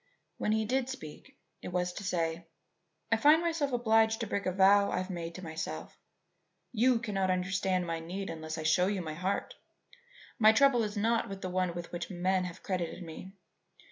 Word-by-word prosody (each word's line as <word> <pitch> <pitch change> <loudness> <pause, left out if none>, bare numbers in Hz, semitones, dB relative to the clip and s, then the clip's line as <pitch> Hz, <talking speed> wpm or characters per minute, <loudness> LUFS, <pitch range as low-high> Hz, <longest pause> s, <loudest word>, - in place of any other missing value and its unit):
When 210 - 0
he 220 0 +1
did 255 +3 0
speak 265 - -9 0.2
it - - -7
was 180 0 -1
to 200 - -7
say: 165 -2 -2 0.6
"I 225 - +4
find 300 +7 +6
myself 330 -4 -1
obliged 225 -2 +3
to - - 0
break 200 -2 -2
a - - +2
vow 200 +2 +5
I - - -1
have 185 +1 -3
made 170 -2 -5
to 185 - -8
myself. 160 -1 -5 0.8
You 245 +1 +3
cannot 200 -5 -1
understand 185 0 0
my 165 -1 -3
need 185 +4 -5
unless 160 0 -6
I 160 - -4
show 180 +4 +3
you 195 -2 -1
my 155 -1 -5
heart. 185 +5 -2 0.9
My 220 -1 +7
trouble 275 -1 +5
is 210 -1 -3
not 205 -2 0
the 185 - -3
one 180 -1 0
with 175 -1 -6
which 175 -1 -5
men 185 0 0
have 180 -1 -8
credited 180 -1 -3
me. 175 +3 -9
190 Hz, 190 wpm, -31 LUFS, 175-220 Hz, 0.9 s, My